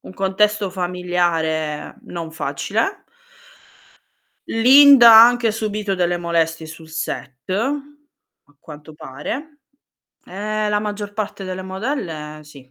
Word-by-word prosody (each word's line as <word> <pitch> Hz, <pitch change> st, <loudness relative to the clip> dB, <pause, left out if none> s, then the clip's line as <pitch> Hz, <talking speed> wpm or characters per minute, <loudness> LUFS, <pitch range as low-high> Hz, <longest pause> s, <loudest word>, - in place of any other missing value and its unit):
un -, -, -12 dB
contesto 200 Hz, +1 st, 0 dB
familiare 175 Hz, -4 st, -2 dB
non 165 Hz, -2 st, -7 dB
facile. 195 Hz, -, -3 dB, 1.5 s
Linda, 260 Hz, +1 st, +7 dB
ha 225 Hz, +1 st, +10 dB
anche 240 Hz, -2 st, +1 dB
subito 210 Hz, -2 st, -3 dB
delle 175 Hz, -1 st, 0 dB
molestie 165 Hz, -1 st, -1 dB
sul 160 Hz, 0 st, -12 dB
set, 135 Hz, -3 st, -6 dB
a 285 Hz, -, -6 dB
quanto 150 Hz, 0 st, -13 dB
pare. 260 Hz, -, -7 dB, 0.7 s
Eh, 210 Hz, +2 st, -3 dB
la 210 Hz, -, +1 dB
maggior 205 Hz, -1 st, -5 dB
parte 210 Hz, -2 st, -5 dB
delle 185 Hz, 0 st, -6 dB
modelle 185 Hz, -, -5 dB
sì, 140 Hz, -3 st, -16 dB
190 Hz, 110 wpm, -20 LUFS, 160-220 Hz, 1.5 s, ha